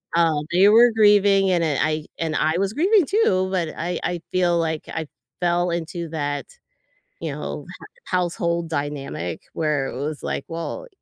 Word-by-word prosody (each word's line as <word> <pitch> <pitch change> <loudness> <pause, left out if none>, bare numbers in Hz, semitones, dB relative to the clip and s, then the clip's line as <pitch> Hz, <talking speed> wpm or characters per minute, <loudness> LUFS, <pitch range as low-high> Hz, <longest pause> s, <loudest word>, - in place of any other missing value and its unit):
um, 160 -3 +2
they 190 +3 +6
were 235 +2 +7
grieving, 200 -2 +5
and, 170 -2 +2
uh, 150 -4 0
I 155 0 0
and 160 -1 -1
I 155 +2 +1
was 195 +2 0
grieving 375 - +4
too, 190 - +2
but 175 -4 0
I 175 +2 -2
I 175 -1 -2
feel 175 -2 +2
like 160 -1 -1
I 160 -2 -4 0.3
fell 175 0 +2
into 170 0 -4
that, 145 -2 -3 0.7
you - - -3
know, - - -6
h 475 - -14
household 170 -2 -1
dynamic 140 - -4
where 150 -4 0
it - - -6
was 150 0 -4
like, - - -3
"Well, 170 - -5
170 Hz, 170 wpm, -23 LUFS, 155-190 Hz, 0.7 s, were